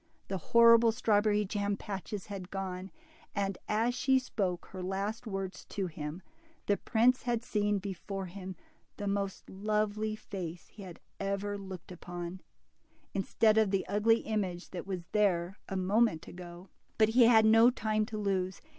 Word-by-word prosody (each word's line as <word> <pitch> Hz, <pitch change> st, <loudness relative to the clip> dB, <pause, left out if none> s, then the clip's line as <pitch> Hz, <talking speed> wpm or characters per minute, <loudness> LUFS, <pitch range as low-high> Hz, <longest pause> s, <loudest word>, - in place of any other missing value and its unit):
The 190 Hz, -1 st, -2 dB
horrible 230 Hz, +4 st, +6 dB
strawberry 210 Hz, -1 st, +2 dB
jam 200 Hz, 0 st, -1 dB
patches 200 Hz, -1 st, -5 dB
had 195 Hz, -3 st, -7 dB
gone, 190 Hz, -1 st, -4 dB, 0.5 s
and 195 Hz, -1 st, 0 dB
as 225 Hz, +3 st, +2 dB
she 265 Hz, +1 st, +3 dB
spoke 195 Hz, -8 st, -2 dB
her 185 Hz, -, -6 dB
last 200 Hz, +5 st, -3 dB
words 195 Hz, -2 st, -4 dB
to 195 Hz, -, -3 dB
him, 155 Hz, +1 st, -6 dB, 0.4 s
the 205 Hz, -, +2 dB
prince 245 Hz, +2 st, +3 dB
had 240 Hz, -1 st, -1 dB
seen 210 Hz, -3 st, +1 dB
before 195 Hz, 0 st, -5 dB
him 185 Hz, 0 st, -7 dB, 0.4 s
the 205 Hz, -, -4 dB
most 200 Hz, -1 st, -2 dB
lovely 215 Hz, +2 st, -1 dB
face 180 Hz, -5 st, -7 dB
he 210 Hz, -, -13 dB
had 180 Hz, -3 st, -9 dB, 0.2 s
ever 200 Hz, +1 st, -2 dB
looked 190 Hz, -3 st, -8 dB
upon, 175 Hz, +1 st, -7 dB, 0.7 s
instead 215 Hz, +3 st, +3 dB
of 215 Hz, -2 st, +3 dB
the 195 Hz, -1 st, 0 dB
ugly 225 Hz, +3 st, +3 dB
image 190 Hz, -5 st, -3 dB
that 180 Hz, 0 st, -6 dB
was 185 Hz, -3 st, -3 dB
there 195 Hz, -3 st, +1 dB
a 195 Hz, -, -3 dB
moment 195 Hz, -1 st, +2 dB
ago. 175 Hz, +1 st, -10 dB, 0.3 s
But 215 Hz, -1 st, +5 dB
he 240 Hz, +1 st, +6 dB
had 225 Hz, -2 st, +6 dB
no 225 Hz, +2 st, +7 dB
time 215 Hz, -3 st, 0 dB
to 220 Hz, -, -5 dB
lose. 190 Hz, -2 st, -1 dB
200 Hz, 155 wpm, -31 LUFS, 185-215 Hz, 0.7 s, no